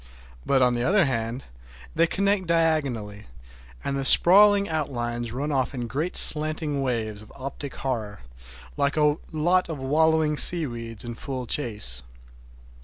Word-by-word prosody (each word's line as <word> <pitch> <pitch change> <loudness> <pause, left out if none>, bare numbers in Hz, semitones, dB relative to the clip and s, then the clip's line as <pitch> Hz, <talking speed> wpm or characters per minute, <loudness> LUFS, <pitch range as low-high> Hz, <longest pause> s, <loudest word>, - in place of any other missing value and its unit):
But, 135 -2 +3
on 125 -1 +3
the 120 0 -1
other 195 +4 +3
hand, 120 0 -3 0.5
they 165 +1 +3
connect 200 +1 0
diagonally, 140 -11 -1 0.6
and 140 - -2
the 135 - -2
sprawling 200 +8 +6
outlines 120 -7 -3
run 140 +5 -3
off 135 0 -1
in 120 -2 -3
great 150 +9 -3
slanting 155 -2 +2
waves 110 -5 -2
of 110 - -14
optic 135 +1 -7
horror, 110 -6 -4 0.6
like 140 +1 0
a 150 0 +3
lot 175 +4 +1
of 160 - -4
wallowing 155 +2 +2
seaweeds 120 - -3
in 120 - -5
full 130 +2 -5
chase. 105 - -2
140 Hz, 140 wpm, -25 LUFS, 120-160 Hz, 0.6 s, sprawling